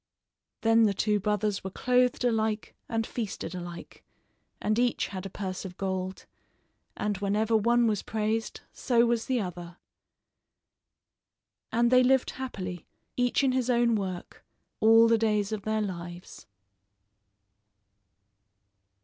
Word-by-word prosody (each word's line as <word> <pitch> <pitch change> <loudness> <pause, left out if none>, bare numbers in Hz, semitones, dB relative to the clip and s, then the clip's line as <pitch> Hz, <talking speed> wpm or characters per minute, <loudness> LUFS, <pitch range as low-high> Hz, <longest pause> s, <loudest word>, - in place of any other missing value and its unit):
Then 225 0 +5
the 200 - -1
two 210 +1 +1
brothers 210 0 -1
were 190 - -4
clothed 250 +5 +1
alike 220 -2 0 0.2
and 225 -1 -1
feasted 220 -6 -5
alike, 175 -1 -8 0.6
and 215 +2 0
each 245 -1 +1
had 190 -1 -5
a - - -10
purse 190 -1 -5
of 180 -2 -8
gold; 190 -1 -3 0.7
and 205 -2 -2
whenever 210 +3 +1
one 235 +2 +3
was 215 -3 +1
praised, 220 +1 -2
so 240 -3 +2
was 235 -1 0
the 255 -2 +1
other. 175 -3 -6 1.9
And 235 +1 +2
they 255 0 +7
lived 260 +1 +3
happily, 185 -9 -6 0.3
each 245 +2 +1
in 265 - +3
his 255 -1 0
own 235 -1 +3
work, 190 -4 -4 0.4
all 225 +1 +6
the 230 -1 +3
days 210 -2 +1
of 215 -2 -3
their 215 0 0
lives. 175 -2 -8
215 Hz, 130 wpm, -28 LUFS, 195-235 Hz, 1.9 s, they